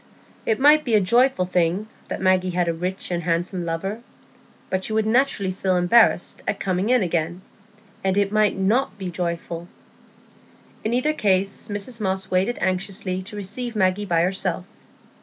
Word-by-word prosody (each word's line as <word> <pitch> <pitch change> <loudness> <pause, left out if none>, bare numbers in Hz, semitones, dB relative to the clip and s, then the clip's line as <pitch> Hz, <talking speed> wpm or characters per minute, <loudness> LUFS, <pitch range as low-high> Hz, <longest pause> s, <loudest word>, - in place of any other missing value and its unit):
It 220 - +1
might 300 +3 +6
be 235 -5 +1
a - - +6
joyful 235 +1 +3
thing 180 +3 0 0.2
that - - -5
Maggie 185 -1 +3
had 175 -1 0
a 170 - +1
rich 180 +3 -4
and 175 -1 -1
handsome 175 +2 -1
lover, 195 +7 -3 0.7
but 190 0 0
she 220 - -1
would 220 0 +1
naturally 220 -4 +2
feel 185 0 0
embarrassed 180 +2 +3
at - - -1
coming 190 +2 -1
in 250 -4 +4
again; 170 +1 -2 0.6
and 190 0 +1
it 200 -1 +2
might 215 -1 +2
not 210 +4 +1
be 190 -2 -5
joyful. 170 -1 -4 1.2
In 220 +2 0
either 300 +5 +1
case 195 -5 0
Mrs 215 +3 -3
Moss 190 -1 -2
waited 190 +6 +1
anxiously 185 0 -1
to 205 +3 -8
receive 225 +4 -4
Maggie 190 0 +1
by 170 -3 +2
herself. 185 0 -1
190 Hz, 165 wpm, -23 LUFS, 180-215 Hz, 1.2 s, might